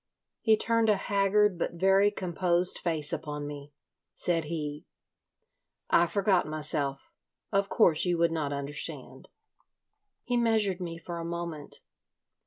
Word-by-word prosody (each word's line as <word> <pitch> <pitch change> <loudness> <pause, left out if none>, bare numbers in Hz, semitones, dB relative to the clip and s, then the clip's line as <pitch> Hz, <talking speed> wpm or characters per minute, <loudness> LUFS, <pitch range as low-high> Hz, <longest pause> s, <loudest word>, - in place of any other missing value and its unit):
He 220 -2 +4
turned 230 0 +2
a 210 - +5
haggard 200 -1 +2
but - - -2
very 195 +3 +4
composed 180 -2 +2
face 160 -3 -1
upon 150 -2 -4
me. 145 0 -8 0.4
Said 165 -3 -1
he: 150 -2 -5 1.0
"I 170 - +5
forgot 195 -2 +1
myself. 150 -3 -3 0.4
Of 200 -1 +1
course 165 -8 +3
you 175 -1 +1
would 170 0 +2
not 155 -3 -2
understand." 140 0 -6 0.9
He 245 0 -1
measured 220 -5 +1
me 165 -2 -5
for 170 0 -7
a - - -5
moment. 170 -3 -6
170 Hz, 130 wpm, -29 LUFS, 155-195 Hz, 1.0 s, a